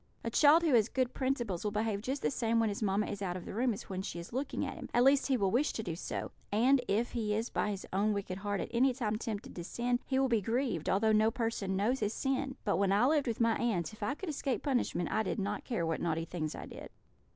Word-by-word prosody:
A 230 - -2
child 305 +6 +6
who 315 -5 +3
has 225 -2 +4
good 255 -2 0
principles 240 -9 -1
will 210 - 0
behave 210 -1 -1
just 265 +5 -3
the - - +2
same 230 -3 +1
when 225 -1 +2
his 205 - -4
mamma 205 0 +1
is 205 -1 -5
out 180 -2 -2
of 180 - -9
the - - -6
room 240 +4 +1
as 215 +1 -5
when 190 -1 -5
she 190 - -5
is 170 +5 -8
looking 270 +3 -2
at - - -4
him - - -8
at 240 - +5
least 275 +1 +4
he 265 -2 +2
will 195 -4 +1
wish 270 +6 +2
to 220 - -3
do 170 -6 -3
so; 170 - -4 0.2
and 250 +6 +4
if 220 +4 +1
he 215 -3 -1
is 225 +3 -2
by - - 0
his 200 -2 -4
own 205 +3 +2
wicked 195 -2 -3
heart 205 0 -2
at - - -5
any 250 +2 +3
time 215 -4 -1
tempted 225 +2 -5
to 175 - -5
sin, 245 +6 -1
he 265 - 0
will 270 0 +3
be 230 -4 +2
grieved, 225 - -1
although 220 +3 +3
no 215 +1 +4
person 225 -5 -2
knows 225 +7 +1
his 210 +1 -1
sin. 270 0 -1
But 200 - +2
when 195 0 +2
I 205 +5 +4
lived 290 -1 +2
with 230 - -2
my 230 -1 +3
aunts, 205 -7 -1
if 215 - -14
I 275 - -1
could 380 +2 -6
escape 275 -3 -2
punishment, 245 - 0
I 220 - +2
did 190 - -2
not 200 +1 -3
care 210 -10 -1
what 165 -1 -1
naughty 165 -1 -1
things 155 -3 -4
I - - -7
did. - - -9
225 Hz, 275 wpm, -32 LUFS, 200-255 Hz, 0.2 s, child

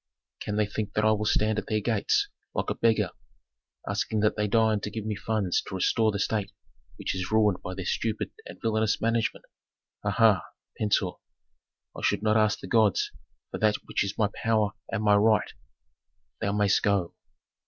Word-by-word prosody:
"Can 105 - -3
they 105 0 +2
think 105 0 -4
that 105 - +1
I 110 - +5
will 105 0 0
stand 110 0 +2
at 105 - -8
their 110 -1 +1
gates, 110 -1 +1 0.3
like - - -1
a - - +1
beggar, 110 -5 +2 0.8
asking 110 -1 -1
that 105 - +2
they 105 0 0
deign 110 0 +3
to 105 - -4
give 110 0 -5
me 110 - -1
funds 100 -3 0
to - - -5
restore 110 +4 +2
the 100 - -3
state 100 -1 -1 0.4
which - - -3
is 95 +1 -4
ruined 105 -4 +3
by 90 - -6
their 95 -1 -5
stupid 110 +4 -2 0.2
and - - -10
villanous 110 -1 +1
management? 115 0 0 0.6
Ha, - - -1
ha! 110 -5 +4 0.3
Pentuer, 100 -3 0 0.8
I - - -7
should - - +1
not 110 0 +3
ask 110 -1 +3
the - - -7
gods 110 -4 +2 0.4
for - - -5
that 105 -1 +3
which - - 0
is 100 - -4
my 105 -3 +2
power 110 -3 +1 0.2
and 105 - -1
my 105 -1 +5
right 110 0 +3 0.9
Thou 100 - -1
mayst 105 -1 +3
go." 100 -4 +1
105 Hz, 185 wpm, -27 LUFS, 100-110 Hz, 0.9 s, I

